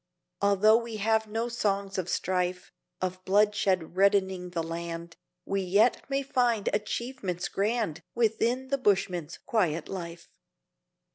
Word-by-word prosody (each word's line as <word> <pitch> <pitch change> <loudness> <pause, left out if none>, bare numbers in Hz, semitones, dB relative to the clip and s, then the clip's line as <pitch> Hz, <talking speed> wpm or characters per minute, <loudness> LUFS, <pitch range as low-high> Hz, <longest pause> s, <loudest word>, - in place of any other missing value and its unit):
Although 200 +2 +5
we 230 -2 -4
have 220 +1 +1
no 225 +2 -2
songs 200 -4 -1
of 180 -1 -3
strife, 180 -1 -1 0.3
Of 185 0 -3
bloodshed 195 -4 +2
reddening 190 -2 +2
the 170 -2 -2
land, 170 0 -5 0.3
We 195 0 -1
yet 205 +9 +2
may 275 0 0
find 245 -5 +1
achievements 210 -4 -2
grand 210 -5 -1
Within 235 +3 +1
the 275 0 0
bushman's 180 - 0
quiet 175 - 0
life. 170 -3 -7
200 Hz, 125 wpm, -28 LUFS, 180-225 Hz, 0.3 s, Although